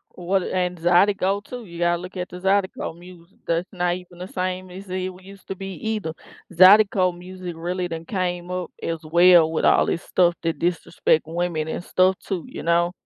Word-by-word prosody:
What 180 +1 0
and 180 -1 -1
Zydeco, 190 +3 +3
too, 250 -1 -8
you 170 -3 -10
gotta 175 0 +2
look 185 +1 -9
at 180 0 -3
the 180 - -9
Zydeco 190 -3 0
music. 175 +1 -15
That's 170 +2 0
not 175 -2 0
even 180 -1 -12
the 180 - -6
same 185 0 -3
as 190 +1 -10
it 185 0 -2
w 185 -1 -9
used 195 0 -15
to 195 - -4
be 195 0 -6
either. 205 -2 -3 0.4
Zydeco 185 0 +6
music 180 0 -8
really 180 +2 -3
then 165 -1 -6
came 180 -2 -3
up 180 -1 -4
as 165 -1 -2
well 170 0 +6
with 160 - -1
all - - +5
this 170 - -2
stuff 175 -1 +2
that 165 -1 -1
disrespect 170 -2 +1
women 165 -2 -2
and 175 - -4
stuff 185 +1 +2
too, 185 -5 -4
you - - -8
know? 170 +1 +2
180 Hz, 200 wpm, -23 LUFS, 175-185 Hz, 0.4 s, Zydeco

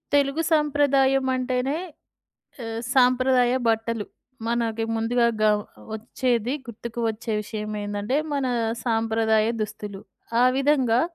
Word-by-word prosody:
తెలుగు 280 +2 +2
సాంప్రదాయం 280 -3 +3
అంటేనే 255 +3 -1 0.9
ఆహ్, 225 0 -4
సాంప్రదాయ 255 -1 +4 0.2
బట్టలు. 225 -1 0 0.4
మనకి 230 -1 0
ముందుగా 235 +2 +1 0.2
గ - - +3 0.5
వచ్చేది 240 +1 -1
గుర్తుకు 235 +1 -6
వచ్చే 225 0 -3
విషయమేందంటే, 210 +2 -3 0.2
మన 280 -2 0 0.4
సాంప్రదాయ 225 -2 +2
దుస్తులు. 205 -2 -5 0.4
ఆ - - +6
విధంగా, 265 -4 +3
235 Hz, 95 wpm, -24 LUFS, 220-265 Hz, 0.9 s, ఆ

